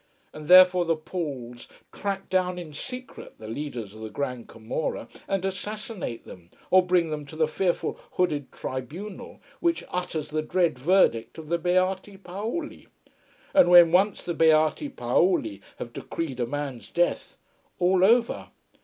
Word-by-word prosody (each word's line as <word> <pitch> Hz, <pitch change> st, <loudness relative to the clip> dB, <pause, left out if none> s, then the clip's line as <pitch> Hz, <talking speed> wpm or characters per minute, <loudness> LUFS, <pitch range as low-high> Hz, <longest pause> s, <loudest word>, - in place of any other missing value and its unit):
And 155 Hz, -1 st, -9 dB
therefore 185 Hz, 0 st, +8 dB
the 165 Hz, 0 st, +2 dB
Pauls 140 Hz, -8 st, -6 dB, 0.2 s
track 195 Hz, -1 st, -4 dB
down 180 Hz, -1 st, 0 dB
in 165 Hz, -4 st, -8 dB
secret 250 Hz, -, -8 dB
the 110 Hz, -, -10 dB
leaders 115 Hz, -4 st, -5 dB
of 110 Hz, -, -12 dB
the 110 Hz, -, -5 dB
Grand 125 Hz, +1 st, -4 dB
Camorra, 115 Hz, +7 st, -4 dB, 0.2 s
and 195 Hz, -1 st, -1 dB
assassinate 195 Hz, -, -5 dB
them, 85 Hz, -2 st, -13 dB, 0.2 s
or 185 Hz, 0 st, +7 dB
bring 175 Hz, -3 st, +2 dB
them 150 Hz, -1 st, -3 dB
to 155 Hz, -, -10 dB
the 155 Hz, -1 st, +2 dB
fearful 175 Hz, +3 st, -1 dB
hooded 150 Hz, -6 st, 0 dB
tribunal 155 Hz, -, -7 dB, 0.2 s
which 340 Hz, -1 st, +1 dB
utters 165 Hz, -4 st, -3 dB
the 155 Hz, 0 st, -1 dB
dread 170 Hz, -3 st, 0 dB
verdict 145 Hz, -7 st, +2 dB
of 155 Hz, -2 st, -9 dB
the 170 Hz, 0 st, +1 dB
Beati 185 Hz, +3 st, 0 dB
Paoli. 210 Hz, -, -5 dB, 0.7 s
And 280 Hz, -9 st, +6 dB
when 175 Hz, -2 st, +8 dB
once 195 Hz, +3 st, +3 dB
the 175 Hz, -, -3 dB
Beati 160 Hz, -, +3 dB
Paoli 120 Hz, -, +1 dB, 0.2 s
have 120 Hz, -, -7 dB
decreed 145 Hz, -7 st, -5 dB
a 120 Hz, -, 0 dB
man's 140 Hz, -2 st, -5 dB
death 175 Hz, 0 st, -1 dB, 0.4 s
all 180 Hz, +1 st, +3 dB
over. 230 Hz, +4 st, +3 dB
170 Hz, 150 wpm, -26 LUFS, 140-185 Hz, 0.7 s, therefore